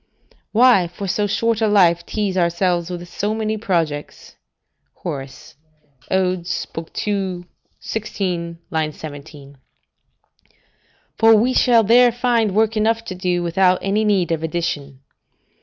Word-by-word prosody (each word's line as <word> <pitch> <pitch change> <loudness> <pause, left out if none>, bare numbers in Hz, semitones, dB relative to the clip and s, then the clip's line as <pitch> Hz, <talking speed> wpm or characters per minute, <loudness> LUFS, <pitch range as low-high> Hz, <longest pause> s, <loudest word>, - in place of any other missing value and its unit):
["Why 230 -6 +5
for 185 +3 -7
so 205 +3 0
short 225 +2 0
a 220 - +3
life 175 -5 +3
tease 205 -3 -2
ourselves 175 0 0
with 175 -1 -6
so 205 +5 -3
many 220 -1 -2
projects?" 165 -8 -3 0.6
Hor., 140 - -5 0.9
Od., 185 -2 0 0.6
ii. 190 -3 -2 0.3
16, 180 -6 -4
17.] 150 -2 -6 1.6
for 225 -1 +7
we 240 +4 +2
shall 235 -3 +4
there 240 +3 +5
find 235 -4 0
work 220 +1 +2
enough 225 +1 +1
to 190 - -5
do, 180 -1 -1
without 180 +2 +3
any 205 +2 +1
need 195 -5 +1
of 165 -1 -1
addition. 155 -5 -4
185 Hz, 120 wpm, -20 LUFS, 170-215 Hz, 1.6 s, for